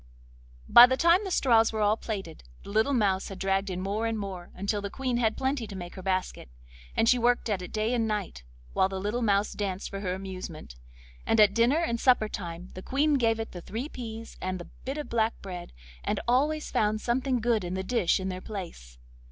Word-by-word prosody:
By 240 +1 +10
the 260 +1 0
time 340 +5 +4
the 390 - -4
straws 230 -9 +4
were 220 -1 -2
all 210 +1 +4
plaited 195 - -6 0.2
the - - -9
little 220 +7 +2
mouse 195 -5 +1
had 195 - -7
dragged 195 +1 0
in 180 -1 -3
more 205 +4 -1
and 225 -1 -1
more, 190 -4 -6
until 200 +2 -1
the 200 - -4
Queen 255 +1 -2
had 220 -2 +1
plenty 265 -3 -1
to 200 - -8
make 175 -2 -7
her 190 - -8
basket, 185 - -2 0.5
and 225 - +3
she 250 +1 +5
worked 240 -1 +2
at 195 -3 -1
it 180 - -8
day 215 +2 0
and 230 -2 +1
night, 205 - -3 0.3
while 190 - +3
the 190 -1 -4
little 210 +5 -2
mouse 205 -2 +2
danced 195 -2 -3
for 195 - -4
her 185 -2 -2
amusement; 185 - -7 0.5
and 225 - +1
at 210 -2 +6
dinner 235 +6 +3
and 235 -9 0
supper 245 -4 +4
time 175 -2 -7
the 185 - -8
Queen 290 +8 +1
gave 230 -5 +2
it 225 - -4
the 175 - -8
three 230 - -5
peas 230 -4 -8
and 185 0 -2
the 175 - -10
bit 270 +3 -3
of 300 - -4
black 225 -1 0
bread, 180 -3 -7 0.3
and - - -1
always 295 +5 +1
found 215 0 +1
something 250 +2 0
good 225 -3 +1
in 175 +1 -3
the 190 - -2
dish 190 -5 +1
in 190 0 -3
their 185 0 -5
place. 170 - -8
215 Hz, 225 wpm, -28 LUFS, 190-240 Hz, 0.5 s, By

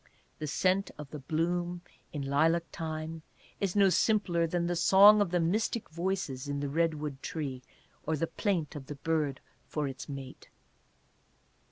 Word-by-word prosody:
The 155 - -3
scent 185 +6 +1
of 150 -2 -9
the 150 - -6
bloom 175 +4 -1 0.3
in 145 -3 -4
lilac 160 +5 +2
time 160 0 -5 0.4
is 195 -2 -1
no 200 -1 +6
simpler 180 -6 +2
than 170 +1 0
the 175 0 0
song 200 +4 +7
of 200 - +2
the 175 +1 +1
mystic 210 +7 0
voices 170 -6 -2
in 140 0 -2
the 145 0 -2
redwood 150 -3 -1
tree, 140 -5 -4 0.4
or 160 - 0
the 165 - +1
plaint 170 -5 -1
of 135 -3 -7
the 145 - -6
bird 150 -2 -1 0.3
for 150 -2 -2
its 135 +1 -7
mate. 135 -2 -8
165 Hz, 160 wpm, -30 LUFS, 145-175 Hz, 0.4 s, song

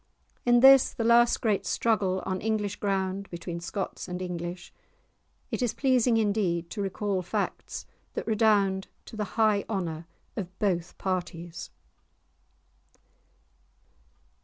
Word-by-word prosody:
In 240 0 +6
this, 270 0 +7
the 230 - -1
last 235 +1 +5
great 215 -4 +1
struggle 200 -5 +1
on 185 -1 -2
English 210 -2 -1
ground 195 -1 -1
between 170 0 -5
Scots 190 +3 -4
and 180 0 -4
English, 175 -1 -5 0.8
it - - -2
is 240 -3 0
pleasing 255 -3 +3
indeed 195 -6 0
to 210 - -3
recall 195 0 -1
facts 180 - -3 0.3
that - - -3
redound 205 -3 +2 0.2
to - - -10
the 210 -1 -5
high 215 -2 +3
honour 170 -6 -3 0.3
of 185 -3 -6
both 175 -4 -1
parties. 175 -2 -4
195 Hz, 120 wpm, -28 LUFS, 180-220 Hz, 0.8 s, this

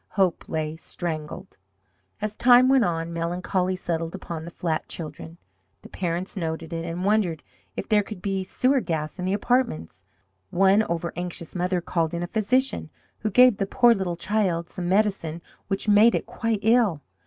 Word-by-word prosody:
Hope 190 -3 +1
lay 155 -1 -2
strangled! 165 +2 -6 0.7
As 215 0 -2
time 250 +2 +6
went 265 -2 +5
on, 165 -1 -2
melancholy 180 +2 -1
settled 165 -1 -3
upon 170 -4 -6
the - - -6
flat 165 -2 -3
children. 160 +1 -8 0.5
The - - -12
parents 175 +1 -3
noted 165 -2 -4
it, 165 0 -3
and 170 +2 -4
wondered 200 -6 +1 0.3
if - - -4
there 210 -2 +4
could 205 -1 -8
be 195 0 -2
sewer 255 +8 +1
gas 155 -4 -3
in 180 - -2
the 190 - 0
apartments. 205 - -1 0.5
One 195 - +4
over 170 -4 -2
anxious 175 -2 -5
mother 180 0 0
called 165 -1 -1
in 170 - -2
a - - -3
physician, 250 +7 0 0.3
who 215 - -1
gave 250 0 +6
the 195 - -1
poor 240 +2 +5
little 190 -5 -2
child 180 -3 -1
some 175 -1 -4
medicine 190 -5 +1 0.3
which 195 +2 -2
made 210 +3 +6
it - - -2
quite 230 -3 -2
ill. 220 - +3
180 Hz, 170 wpm, -25 LUFS, 165-215 Hz, 0.7 s, time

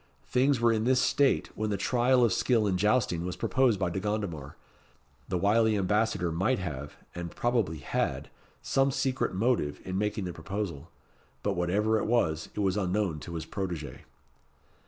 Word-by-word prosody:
Things 130 +1 +2
were 120 0 +4
in 110 0 0
this 130 0 +4
state 140 +1 +2
when 110 0 -2
the 100 - -1
trial 125 +4 +3
of 115 -5 +3
skill 115 +2 +2
in 95 -2 +1
jousting 105 -3 +1
was 90 0 -3
proposed 125 -6 +2
by 90 -3 0
De 95 - -2
Gondomar. 95 -9 -3 0.7
The 90 - 0
wily 110 +3 +3
Ambassador 100 -2 +1
might 95 +11 +1
have 75 -6 -5 0.2
and 85 -1 -5
probably 115 -6 0
had - - -2 0.3
some 135 0 +2
secret 130 -6 -1
motive 100 - 0
in 95 0 -2
making 105 -1 -1
the 90 - -4
proposal; 95 -7 -5 0.5
but 100 - +1
whatever 105 +6 +1
it - - -2
was, 80 -10 +1
it 105 - -1
was 95 0 +1
unknown 95 -4 0
to 85 +3 -8
his 80 - -4
protégé. 90 -6 -5
100 Hz, 170 wpm, -29 LUFS, 90-115 Hz, 0.7 s, were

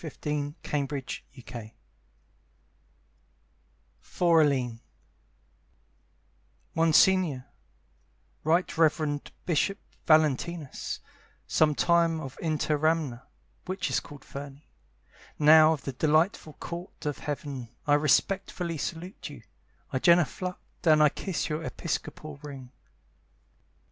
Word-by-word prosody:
A 160 - -5
Blue 145 0 -2
Valentine 130 -5 -5 2.3
(For 170 -2 +3
Aline) 130 -6 +1 1.9
Monsignore, 165 -3 +4 1.0
Right 165 +4 +2
Reverend 155 -2 +1
Bishop 180 +4 +1 0.3
Valentinus, 155 -1 +1 0.4
Sometime 165 +2 +3
of 135 -4 -7
Interamna, 155 -4 0 0.4
which 185 +1 -2
is - - +2
called 145 -2 -12
Ferni, 140 +1 -9 0.7
Now 155 +1 +7
of 150 - -6
the 135 - -4
delightful 155 - +1
Court 170 +1 -8
of 145 -1 -2
Heaven, 140 -5 -5 0.2
I 145 - +3
respectfully 170 +2 +1
salute 175 +6 -5
you, - - -11 0.5
I - - +1
genuflect 175 +1 +1
And 155 -1 +6
I 150 - +6
kiss 185 +4 -3
your 155 0 -3
episcopal 155 -2 -5
ring. 135 -4 -9
155 Hz, 90 wpm, -28 LUFS, 145-165 Hz, 2.3 s, Now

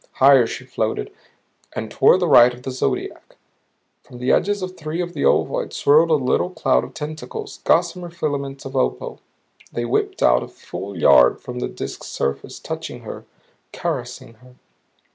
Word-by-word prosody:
Higher 135 -3 +6
she - - -7
floated, - - -3 0.6
and 110 -1 -5
toward 185 +7 +4
the 175 - +2
right 120 -4 +7
of 125 - -16
the 130 - -4
zodiac. 130 - -3 0.7
From 125 - -14
the 125 +1 0
edges 205 -1 +1
of 185 0 -5
three 155 +1 -5
of 175 -1 -3
the - - -3
ovoids - - +1
swirled 155 +4 +4
a 160 - +5
little 135 +5 +1
cloud 160 -7 +1
of 125 +1 -10
tentacles, 155 - -7
gossamer 180 -1 +1
filaments 140 -5 -4
of 135 0 -7
opal. 95 - -1 0.5
They 120 - -3
whipped 120 - -1
out - - +5
a - - -6
full 100 -1 -8
yard 65 -5 +5
from 125 0 -7
the - - -2
Disk's - - -7
surface, 70 0 -3
touching - - -6
her, - - -9 0.5
caressing 125 0 -4
her. 125 0 -18
135 Hz, 165 wpm, -21 LUFS, 125-165 Hz, 0.7 s, right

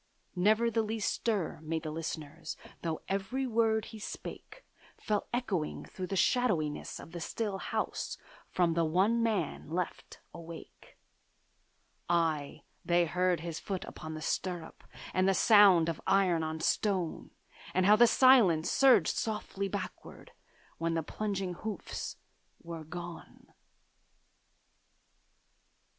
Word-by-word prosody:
Never 215 +6 +3
the 225 0 +2
least 220 -1 -1
stir 205 -11 -1
made 160 0 -3
the 155 - -4
listeners, 155 0 -5 0.2
Though 165 -2 -3
every 200 +8 -1
word 225 -2 +2
he 220 - -10
spake - - -8 0.3
Fell 210 -1 -1
echoing 205 -11 -2
through 185 -1 -6
the 195 - -3
shadowiness 175 -7 +1
of - - -11
the 175 - -6
still 200 +3 -3
house - - -3 0.3
From 175 -2 +2
the 170 0 +2
one 190 +9 +2
man 205 -11 -1
left 175 +2 -4
awake: 170 -1 -11 1.1
Ay, 160 -4 0 0.2
they 175 0 +3
heard 180 0 +1
his 165 -1 -5
foot 190 -2 -4
upon 160 0 -7
the 155 - -6
stirrup, 175 -3 -3 0.3
And 185 +1 +3
the 195 - +3
sound 195 -6 +7
of 165 - -3
iron 185 -4 +3
on 160 0 -3
stone, 185 -3 0 0.4
And 185 0 +2
how 210 +2 +7
the 240 +2 +7
silence 215 -12 +5
surged 270 -2 +5
softly 210 -2 -2
backward, 195 0 -7 0.5
When 165 0 0
the 165 - 0
plunging 195 +1 -3
hoofs 215 +4 -5 0.5
were 165 -2 -7
gone. 170 +1 -9
185 Hz, 125 wpm, -31 LUFS, 165-215 Hz, 1.1 s, sound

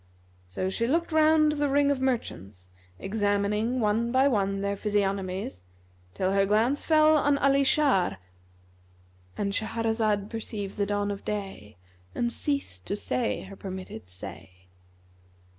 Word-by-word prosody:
So 90 - -3
she 230 +5 -1
looked 335 +6 0
round 310 -1 +4
the 290 -1 0
ring 285 +1 +3
of 270 -2 -1
merchants, 95 - -3 0.3
examining 205 - 0
one 225 +2 +1
by 260 +2 +4
one 195 -6 0
their 200 0 -1
physiognomies, 195 - -2 0.5
till 185 0 0
her 195 0 +2
glance 225 +8 +2
fell 310 -1 +5
on 290 -1 +2
Ali 275 0 +3
Shar,—And 90 - -3
Shahrazad 220 -2 0
perceived 210 -3 -5
the 200 -1 0
dawn 205 0 -1
of 200 - -6
day 195 - -5 0.4
and 235 0 0
ceased 280 - -2
to - - -1
say 235 +3 -1
her 195 +1 -10
permitted 185 - -8
say. 90 0 -10
205 Hz, 130 wpm, -27 LUFS, 185-250 Hz, 0.5 s, fell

